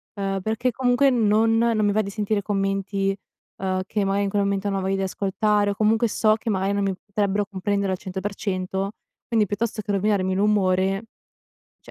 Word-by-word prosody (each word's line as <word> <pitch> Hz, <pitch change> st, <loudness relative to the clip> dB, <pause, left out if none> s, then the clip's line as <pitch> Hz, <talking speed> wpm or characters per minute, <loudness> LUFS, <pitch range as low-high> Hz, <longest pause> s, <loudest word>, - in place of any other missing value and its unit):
Uhm, 195 Hz, -1 st, -2 dB
perché 225 Hz, +5 st, 0 dB
comunque 255 Hz, +3 st, +3 dB
non 225 Hz, -1 st, +3 dB
non 225 Hz, -2 st, +2 dB
mi 205 Hz, -, +3 dB
va 215 Hz, -, +3 dB
di 200 Hz, -, -5 dB
sentire 210 Hz, 0 st, -1 dB
commenti, 195 Hz, 0 st, -1 dB, 0.5 s
uhm, 185 Hz, -1 st, 0 dB
che 210 Hz, -1 st, -1 dB
magari 195 Hz, +1 st, +1 dB
in 195 Hz, -, -1 dB
quel 200 Hz, 0 st, +1 dB
momento 200 Hz, 0 st, -1 dB
non 195 Hz, -1 st, -1 dB
ho -, -, -3 dB
voglia 195 Hz, +1 st, 0 dB
di -, -, -2 dB
ascoltare 205 Hz, +2 st, +1 dB
o -, -, -4 dB
comunque 220 Hz, +2 st, +2 dB
so 215 Hz, +1 st, +3 dB
che 225 Hz, +1 st, -5 dB
magari 195 Hz, 0 st, 0 dB
non 200 Hz, 0 st, 0 dB
mi 195 Hz, -1 st, 0 dB
potrebbero 205 Hz, 0 st, 0 dB
comprendere 200 Hz, 0 st, -1 dB
al -, -, -3 dB
100%. 190 Hz, 0 st, -3 dB, 0.4 s
Quindi 220 Hz, -3 st, +2 dB
piuttosto 215 Hz, +2 st, -2 dB
che 205 Hz, -, -4 dB
rovinarmi 195 Hz, -2 st, +1 dB
l'umore, 195 Hz, -1 st, +2 dB, 0.8 s
cioè -, -, -15 dB
200 Hz, 190 wpm, -24 LUFS, 195-215 Hz, 0.8 s, comunque